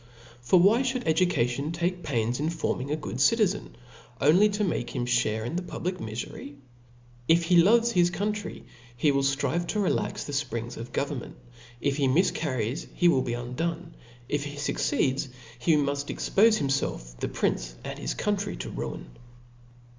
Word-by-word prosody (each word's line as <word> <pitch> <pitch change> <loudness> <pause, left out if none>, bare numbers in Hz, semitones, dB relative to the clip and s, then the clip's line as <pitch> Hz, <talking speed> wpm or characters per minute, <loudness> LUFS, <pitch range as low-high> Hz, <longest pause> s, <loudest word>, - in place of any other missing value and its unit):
For 175 +9 +4
why 205 +7 +5
(hould 255 -1 -1
education 155 -5 +1
take 175 +2 -1
pains 120 -5 -1
in 155 +2 0
forming 160 -4 -2
a 150 - 0
gogd 140 -5 -6
citizen, 210 +4 +2 0.4
only 180 +9 +5
to 210 +1 -1
make 170 -10 -2
him 120 - -1
(hare 115 -3 +1
in 140 - -4
the 180 - 0
pub 175 - -7
lic 185 0 -1
mifery? 115 +5 -6 0.7
If 170 +1 +5
he 170 +1 +5
loves 230 +6 +4
his 175 -4 +4
country, 210 +3 -3 0.3
he 145 +4 +3
will 140 0 +2
ftrive 140 +5 0
to - - -2
rtlax 200 - 0
the 145 - -6
fprings 120 -4 -3
of 115 +1 -8
government; 140 -3 -3 0.5
if 140 -1 0
he 140 -2 +2
mifcar 150 -1 +1
ries, 115 +7 -2
he 175 -1 +4
will 135 -6 +3
be 120 -1 -2
undone; 165 +8 -4 0.3
if 145 +1 -1
he 145 0 -6
fucceeds, 140 -1 0 0.3
he 155 +6 +3
muft 140 -1 0
ex - - -4
pofc 220 +2 +5
himfelf^ - - -2
the - - -1
prince, - - -1
and - - -6
his - - -3
country, 205 -1 -1
to - - -6
ruin. - - -5
150 Hz, 175 wpm, -27 LUFS, 125-180 Hz, 0.7 s, why